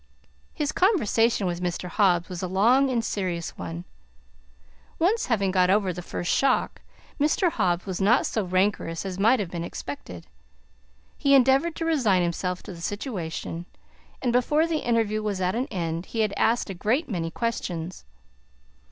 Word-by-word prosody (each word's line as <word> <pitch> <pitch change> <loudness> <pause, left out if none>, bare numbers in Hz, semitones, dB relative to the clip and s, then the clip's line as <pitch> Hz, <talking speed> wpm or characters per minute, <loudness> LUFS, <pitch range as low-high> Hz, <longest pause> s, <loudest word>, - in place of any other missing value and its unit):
His 295 -1 -1
conversation 235 - +2
with 175 -1 -2
Mr. 180 0 -3
Hobbs 180 -3 +2
was 180 -2 -6
a 185 - -2
long 235 +9 +3
and 235 -3 0
serious 180 -4 -3
one. 85 0 -6 1.1
Once 405 +7 +1
having 200 -5 +1
got 185 -1 +3
over 195 -2 +2
the 180 - -6
first 175 0 -2
shock, 270 -2 +1 0.4
Mr. 310 +5 +2
Hobbs 175 - 0
was 190 -1 -4
not 225 +6 +4
so 215 - -1
rancorous 185 -2 0
as 190 -1 -5
might 230 +5 +4
have 190 -5 -3
been 170 -1 -4
expected; 140 - -7 0.9
he 280 0 +4
endeavored 270 +5 +4
to 330 - -3
resign 235 - +2
himself 180 +1 -2
to 200 - -8
the 170 - -11
situation, 175 - -4 0.6
and 245 -2 +1
before 295 +6 +3
the 330 -2 -1
interview 225 -2 +1
was 210 -3 -2
at 185 0 0
an 250 +4 -1
end 170 - -3
he 225 - -2
had 210 -2 +1
asked 230 -3 +1
a - - -4
great 235 - 0
many 170 -6 -2
questions. 180 -5 -4
200 Hz, 165 wpm, -25 LUFS, 180-245 Hz, 1.1 s, not